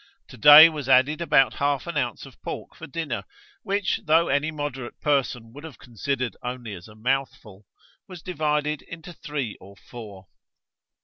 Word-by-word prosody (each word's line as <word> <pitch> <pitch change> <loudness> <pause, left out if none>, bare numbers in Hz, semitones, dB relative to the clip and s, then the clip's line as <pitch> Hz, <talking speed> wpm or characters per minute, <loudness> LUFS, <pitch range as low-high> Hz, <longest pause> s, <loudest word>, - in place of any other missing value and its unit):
To - - -12
day 150 +7 +10
was 150 -5 -5
added 135 +5 +4
about 135 -7 +3
half 140 -1 -1
an 170 -2 -6
ounce 125 -6 -2
of - - -16
pork - - -7
for 165 - -11
dinner, 150 -3 -4 0.4
which, 200 -3 -1
though 165 +2 +3
any 140 +3 +1
moderate 145 -5 -6
person 125 -5 -1
would 145 +3 -11
have 160 -4 -10
considered 125 -1 -4
only 125 -3 -6
as 90 0 -10
a 105 - -15
mouthful, 110 -4 -3 0.4
was 180 -3 -11
divided 150 -3 -1
into 165 +1 -11
three 145 -9 -5
or 100 +1 -14
four. 105 -6 -11
140 Hz, 165 wpm, -24 LUFS, 120-155 Hz, 0.4 s, day